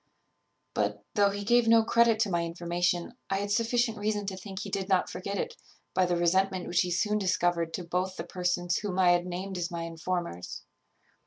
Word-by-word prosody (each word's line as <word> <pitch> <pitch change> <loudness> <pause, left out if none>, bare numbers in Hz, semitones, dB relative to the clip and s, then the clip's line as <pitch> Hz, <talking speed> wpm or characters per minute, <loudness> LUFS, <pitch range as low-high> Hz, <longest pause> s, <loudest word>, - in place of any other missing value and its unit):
"But, - - -1
though 200 -2 +4
he 205 +1 -4
gave 240 +2 +4
no 230 0 +6
credit 230 0 +4
to 205 - +1
my 170 -1 +1
information, 175 +3 -1 0.2
I 195 - +1
had 205 +1 -2
sufficient 230 0 +1
reason 210 0 -1
to 195 -1 -3
think 190 +1 -9
he 200 - -6
did 195 0 -2
not 190 -2 +2
forget 200 +2 -4
it, 475 0 -3 0.4
by 185 -1 +3
the 175 -1 +1
resentment 185 +2 +2
which 175 - +2
he 180 - -1
soon 210 +4 +1
discovered 175 -3 +1
to 180 - -5
both 180 +2 -2
the - - -4
persons 175 0 -1
whom 200 -3 -3
I 180 -2 +5
had 175 0 +2
named 185 +1 -4
as 175 - -2
my 170 -1 -4
informers. 165 - -4
185 Hz, 200 wpm, -29 LUFS, 175-205 Hz, 0.4 s, no